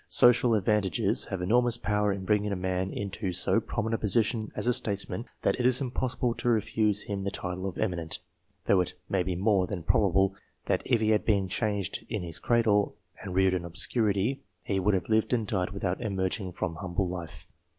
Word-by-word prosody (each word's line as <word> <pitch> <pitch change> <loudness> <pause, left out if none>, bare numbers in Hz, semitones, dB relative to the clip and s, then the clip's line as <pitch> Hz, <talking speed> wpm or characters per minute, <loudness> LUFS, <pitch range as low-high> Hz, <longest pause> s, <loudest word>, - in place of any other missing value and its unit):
Social 120 -1 +5
advantages 100 -3 +1
have 95 -2 -4
enormous 120 +4 +3
power 105 -2 +1
in 95 -1 -4
bringing 105 +1 +1
a - - 0
man 95 0 -1
into 100 -1 -3
so 90 +5 +2
prominent 110 0 -3
a 115 - -1
position 110 +1 +1
as - - -2
a 125 - +4
statesman, 105 +2 -2 0.2
that - - +1
it 125 - 0
is 130 -1 +3
impossible 125 -2 -1
to 120 - -1
refuse 105 -2 +1
him 100 -2 -4
the 100 - -1
title 95 -1 -4
of 95 - -6
"eminent," 85 -6 -2 0.5
though 95 - +4
it 90 +1 -4
may 95 - +1
be 90 0 -2
more 95 0 +2
than 95 -5 -5
probable 95 +1 +3 0.3
that - - +1
if 120 -3 +2
he 110 0 +3
had 105 - +2
been 100 -3 +2
changed 100 -1 -2
in - - -2
his 85 -2 -3
cradle, 110 -4 +2 0.3
and 95 -2 -6
reared 95 0 +4
in 90 -2 -1
obscurity 100 +7 0 0.2
he 95 -2 -1
would 100 +2 +2
have 95 - -2
lived 110 +2 +2
and 115 -3 +1
died 95 -3 -1
without 100 -1 -3
emerging 95 -2 -2
from 85 -2 -4
humble 90 +2 -2
life. 90 -2 -7
100 Hz, 200 wpm, -28 LUFS, 95-110 Hz, 0.5 s, Social